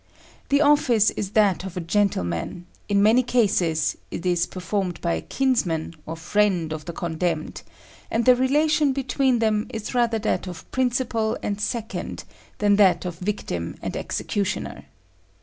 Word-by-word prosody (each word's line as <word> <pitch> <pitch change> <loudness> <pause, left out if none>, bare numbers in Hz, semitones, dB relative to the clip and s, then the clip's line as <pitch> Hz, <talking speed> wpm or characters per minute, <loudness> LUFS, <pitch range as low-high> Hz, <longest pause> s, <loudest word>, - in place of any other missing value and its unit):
The 280 +1 +4
office 260 -8 +4
is 200 0 -5
that 200 -4 +3
of 190 -1 -7
a - - 0
gentleman: 170 - -1 0.2
in 200 0 +3
many 225 +4 +5
cases 195 -11 +1
it 170 - -6
is 175 -1 +2
performed 185 -1 -3
by 170 -1 0
a - - -2
kinsman 180 -13 0
or 165 - -4
friend 175 -1 +1
of 155 -1 -7
the 170 - -4
condemned, 165 -1 -3 0.5
and 230 0 0
the 255 - +7
relation 290 +3 +2
between 265 -1 +1
them 220 -1 +1
is 225 -2 -5
rather 235 -2 +2
that 215 -3 -1
of 175 -3 -9
principal 240 -3 0
and 205 0 -2
second 225 0 -4 0.3
than 205 -1 +3
that 185 -4 +4
of 175 -1 -5
victim 180 - -3
and - - -3
executioner. 200 -2 -3
205 Hz, 150 wpm, -24 LUFS, 175-240 Hz, 0.5 s, the